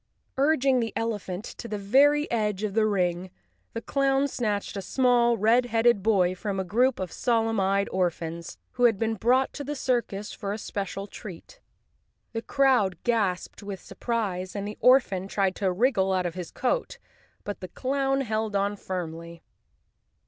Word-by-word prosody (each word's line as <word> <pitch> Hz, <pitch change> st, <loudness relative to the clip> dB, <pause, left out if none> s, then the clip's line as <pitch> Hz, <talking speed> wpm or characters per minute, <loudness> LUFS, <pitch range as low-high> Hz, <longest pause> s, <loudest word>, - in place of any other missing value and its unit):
Urging 275 Hz, -2 st, +3 dB
the 230 Hz, -2 st, -1 dB
elephant 205 Hz, -4 st, -3 dB
to 235 Hz, -, -8 dB
the 215 Hz, -, -3 dB
very 280 Hz, +9 st, +4 dB
edge 210 Hz, -3 st, 0 dB
of 210 Hz, -2 st, -2 dB
the 215 Hz, 0 st, +3 dB
ring, 180 Hz, -2 st, 0 dB, 0.4 s
the 230 Hz, -, -5 dB
clown 275 Hz, 0 st, +1 dB
snatched 210 Hz, -7 st, -2 dB
a 195 Hz, -, -3 dB
small, 240 Hz, +3 st, +3 dB
red 230 Hz, +4 st, +3 dB
headed 230 Hz, -2 st, +3 dB
boy 190 Hz, -4 st, +3 dB
from 195 Hz, +1 st, -3 dB
a -, -, 0 dB
group 235 Hz, +8 st, +2 dB
of 185 Hz, -3 st, -4 dB
solemn 225 Hz, -3 st, +1 dB
eyed 195 Hz, +1 st, +1 dB
orphans, 170 Hz, -2 st, -2 dB
who 245 Hz, -1 st, +2 dB
had 225 Hz, -4 st, +4 dB
been 225 Hz, +2 st, 0 dB
brought 250 Hz, +5 st, +2 dB
to 290 Hz, -, -6 dB
the 295 Hz, +2 st, -4 dB
circus 235 Hz, -6 st, -1 dB
for 200 Hz, -1 st, -4 dB
a -, -, -4 dB
special 195 Hz, -2 st, -4 dB
treat. 205 Hz, -, -11 dB, 0.7 s
The 225 Hz, -, -2 dB
crowd 245 Hz, -, +2 dB
gasped 210 Hz, -7 st, -1 dB
with 200 Hz, -2 st, -6 dB
surprise, 195 Hz, -3 st, -3 dB
and 200 Hz, 0 st, -3 dB
the 210 Hz, -, -7 dB
orphan 245 Hz, -7 st, +4 dB
tried 195 Hz, -1 st, 0 dB
to 195 Hz, -3 st, +1 dB
wriggle 190 Hz, -2 st, +2 dB
out 185 Hz, -1 st, 0 dB
of 175 Hz, -, -2 dB
his 180 Hz, -1 st, -6 dB
coat, -, -, -2 dB, 0.5 s
but 205 Hz, -, -5 dB
the 185 Hz, -, -6 dB
clown 270 Hz, +6 st, -1 dB
held 220 Hz, -3 st, -2 dB
on 200 Hz, +1 st, 0 dB
firmly. 170 Hz, -3 st, -6 dB
210 Hz, 170 wpm, -26 LUFS, 190-245 Hz, 0.7 s, very